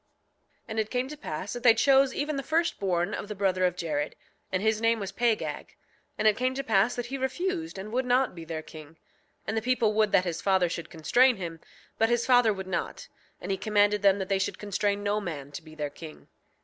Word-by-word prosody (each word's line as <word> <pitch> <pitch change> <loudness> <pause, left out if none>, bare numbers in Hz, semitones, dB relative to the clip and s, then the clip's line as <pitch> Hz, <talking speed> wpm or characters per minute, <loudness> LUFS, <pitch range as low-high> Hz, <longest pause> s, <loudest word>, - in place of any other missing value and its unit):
6:25 - - -45
And 220 0 -2
it 215 -1 -1
came 250 +1 -1
to 300 - -6
pass 185 - -5
that 245 - -5
they 235 -2 +6
chose 270 +3 +4
even 295 +1 -2
the 275 - -2
firstborn 205 - 0
of - - -4
the 210 - -6
brother 185 -2 +1
of 180 -1 +1
Jared; 150 -4 -2 0.4
and 185 +1 -1
his 220 0 +1
name 230 0 +2
was 195 -1 -4
Pagag. 230 +2 -1 0.4
And 215 - +2
it 215 - +5
came 255 +1 -1
to 275 - -2
pass 220 -1 +2
that 245 - -3
he 270 +3 -5
refused 325 - -2
and 200 +3 -7
would 250 +2 -1
not 250 +1 +2
be 170 -2 -9
their 160 -1 -5
king. 155 0 -12 0.5
And 220 - -2
the 220 - 0
people 235 -2 +1
would 215 -1 +2
that 185 -1 +4
his 170 -2 -3
father 190 -3 +2
should 170 0 -5
constrain 245 - +3
him, 170 -4 -6 0.4
but 225 - +3
his 240 0 +1
father 245 -3 +5
would 190 -2 -5
not; 185 -2 -4 0.3
and - - -5
he 195 - 0
commanded 205 0 +2
them 200 -1 +5
that 190 -1 -3
they 195 -1 +1
should - - -2
constrain 205 0 -1
no 205 +1 0
man 145 -7 -6
to 145 - -7
be 155 -1 -14
their 150 -2 -4
king. 155 +1 -12
210 Hz, 235 wpm, -28 LUFS, 180-245 Hz, 0.5 s, they